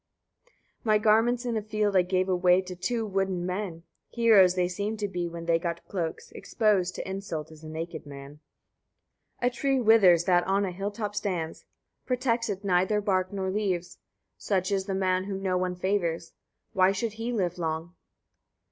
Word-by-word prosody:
49. 215 -2 +3
My - - +6
garments 225 +3 +3
in 240 -2 -1
a 220 - 0
field 210 -1 -1
I 185 - +6
gave 185 +1 0
away 180 -1 +4
to 185 -1 -8
two 220 +6 -2
wooden 190 -3 -1
men: 180 -3 -4 0.3
heroes 210 -6 +5
they 180 -1 +2
seemed 205 +4 -3
to 205 -1 -2
be, 175 -3 -3
when 170 0 -7
they 165 -1 +2
got 170 0 -4
cloaks: 170 -4 -4
exposed 200 -5 0
to - - -5
insult 190 -5 -5
is 155 0 -14
a 155 - -8
naked 160 -1 -6
man. 140 +1 -10 1.0
50. 245 - +3
A - - +4
tree 270 +1 0
withers 205 -7 +6
that 175 -1 +3
on 195 +1 +2
a 185 - -3
hill 195 +3 -3
top 205 -1 -4
stands; 180 -6 -3 0.4
protects 245 -3 0
it 200 0 -4
neither 190 +2 +2
bark 185 -2 0
nor 190 -2 -2
leaves: 190 -4 -2 0.4
such 190 -1 0
is 195 -1 0
the 195 - -1
man 185 -1 +1
whom 195 -1 -5
no 185 -1 +1
one 180 0 -1
favours: 175 -3 -1 0.4
why 185 0 +4
should 205 +3 -2
he 225 +2 -4
live 180 -6 -1
long? 165 +1 -3
190 Hz, 185 wpm, -27 LUFS, 175-210 Hz, 1.0 s, My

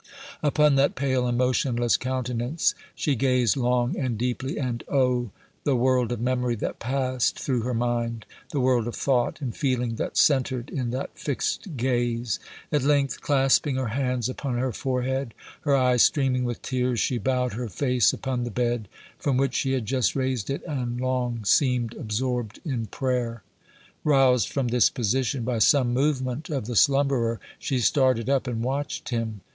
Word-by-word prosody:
Upon 150 -2 +3
that 140 +1 +3
pale 130 -2 0
and 120 0 0
motionless 125 -1 +2
countenance 130 +3 -1 0.2
she 150 - 0
gazed 125 -2 +2
long 125 -1 +1
and 125 -5 -2
deeply, 125 +3 -2
and, 125 -4 -2
oh! 125 -3 +1 0.3
the 140 - +2
world 125 -1 +2
of 120 - -2
memory 125 0 0
that 105 - -4
passed 130 0 0
through 125 -4 -1
her 125 +1 -2
mind! 115 -1 -1 0.2
the 145 - -2
world 125 -3 +2
of 120 - -4
thought 125 -3 0
and 125 -5 -4
feeling 125 -4 -1
that - - -3
centred 130 -3 +2
in 125 -4 -2
that 130 +3 -4
fixed 145 +3 -3
gaze! 120 -3 0 0.3
At 150 - +2
length, 140 0 +1
clasping 135 0 +2
her 130 -3 -1
hands 125 -1 -1
upon 130 -1 -3
her 130 +1 0
forehead, 130 0 -2 0.3
her 145 -2 +2
eyes 125 -2 +3
streaming 130 -3 +3
with 120 -1 -4
tears, 125 -2 0
she 125 - 0
bowed 125 0 0
her 120 +2 -4
face 125 +3 +2
upon 130 -2 -3
the 120 - -3
bed, 120 -3 -1 0.3
from 140 -3 0
which 135 -1 +1
she 135 0 0
had 130 -4 -1
just 130 +2 +1
raised 130 -5 -1
it, 135 - -3
and 125 -6 -3
long 125 -3 -1
seemed 125 -1 +2
absorbed 120 -2 -3
in 125 -7 -2
prayer. 120 -2 -2 0.6
Roused 135 -6 +4
from 135 -4 -1
this 120 0 +4
position 125 +1 -1
by 120 -1 -1
some 125 +1 +4
movement 130 +1 0
of 135 -8 -2
the 120 +1 -4
slumberer, 135 -3 +3 0.2
she 135 - -1
started 130 0 +2
up 135 -1 +1
and 115 -2 -2
watched 135 +3 -3
him. 115 -4 -3
125 Hz, 170 wpm, -25 LUFS, 120-135 Hz, 0.6 s, Roused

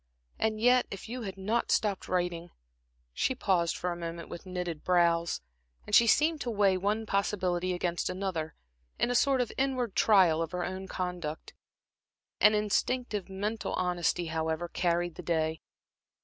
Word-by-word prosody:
And 220 -1 0
yet, 245 +2 +4
if 195 - -8
you 245 +2 -5
had 195 -4 -6
not 215 +5 -1
stopped 205 -3 +1
writing" 175 -1 -1 0.6
She 260 - 0
paused 180 -8 +1
for 180 - -2
a - - -3
moment 170 0 -6
with 175 - -8
knitted 180 -4 -4
brows, 170 - +2 0.4
as 210 - -9
she 235 +2 +7
seemed 310 +5 +3
to 245 - -2
weigh 200 -4 +3
one 205 +4 -1
possibility 185 -3 0
against 175 -1 -1
another, 180 -4 -3 0.4
in 245 - +1
a - - +1
sort 270 +1 +3
of 245 - -2
inward 255 -5 0
trial 185 -7 +5
of 165 +1 -3
her 180 -1 -1
own 190 +1 -5
conduct. 180 -5 -4 0.9
An 215 0 +6
instinctive 210 0 -1
mental 210 +4 -3
honesty, 175 -1 0
however, 160 +1 -2
carried 175 0 0
the - - -5
day. 160 -2 -1
185 Hz, 160 wpm, -30 LUFS, 170-215 Hz, 0.9 s, she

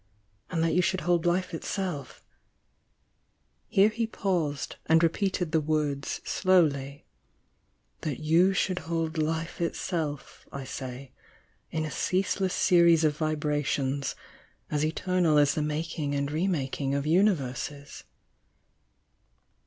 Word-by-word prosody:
— 100 +2 -42
and 165 -2 0
that 165 - +1
you 180 - +4
should 185 +1 0
hold 175 -1 +1
life 180 +1 0
itself" 165 -5 -4 0.7
— - - -45
here 195 +2 +4
he 225 +1 -2
paused, 175 -10 -2
and 160 +1 +5
repeated 180 0 0
the 160 -1 +2
words 150 -2 -1
slowly 145 -7 +1 0.5
— - - -44
"that 150 -4 -3
you 165 +5 +4
should 190 -1 0
hold 165 -1 -1
life 160 +2 -2
itself, 160 -4 -3
I 140 - -6
say, 130 0 -7 0.6
in 155 0 -2
a 155 - -5
ceaseless 190 0 0
series 170 -2 +5
of 150 -1 +2
vibrations 145 -3 -1 0.6
as 150 0 0
eternal 165 0 +1
as 145 -1 +4
the 155 - -1
making 150 -1 -2
and 140 0 -1
re 160 +5 0
mak 145 -7 -2
ing 135 0 0
of 140 0 -1
universes?" 150 -5 0
155 Hz, 130 wpm, -28 LUFS, 145-175 Hz, 0.7 s, and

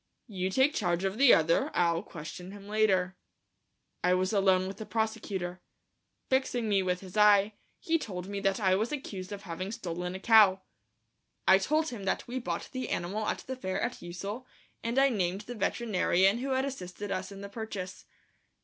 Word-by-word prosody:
"You 190 -5 -3
take 265 +8 +3
charge 175 -3 0
of 195 +4 -2
the 275 -2 +8
other; 165 +1 +4
I'll 170 -1 +2
question 180 +1 -9
him 200 -1 -11
later." 195 -3 +2 0.9
I 180 0 +4
was 185 +2 0
alone 190 -2 +3
with 195 0 -6
the 220 - -6
prosecutor. 190 -5 -2 0.7
Fixing 260 -3 0
me 200 -2 +3
with 180 -1 -1
his 185 0 -11
eye, 210 0 +5 0.3
he 330 0 +1
told 180 -9 -5
me 200 0 -4
that 195 +1 +1
I 190 -3 +3
was 215 +5 0
accused 200 -10 -5
of 200 0 -6
having 185 +2 -5
stolen 180 -5 -4
a - - -5
cow. 200 -3 +6 0.8
I 190 0 +7
told 310 +10 +1
him 215 -6 -7
that 190 - -1
we 250 +2 -3
bought 245 - -4
the 255 -1 -4
animal 205 +5 -2
at - - -2
the 260 - -4
fair 190 -7 -3
at - - -3
Ussel, 200 +8 -6 0.4
and 235 +2 -2
I 275 0 +6
named 190 -4 -1
the 240 +3 -7
veterinarian 200 -2 +2
who 270 +2 -3
had 260 0 +1
assisted 205 -6 -6
us 190 +1 -3
in 195 0 -9
the 200 - -6
purchase. 200 -4 -6
195 Hz, 185 wpm, -30 LUFS, 185-225 Hz, 0.9 s, the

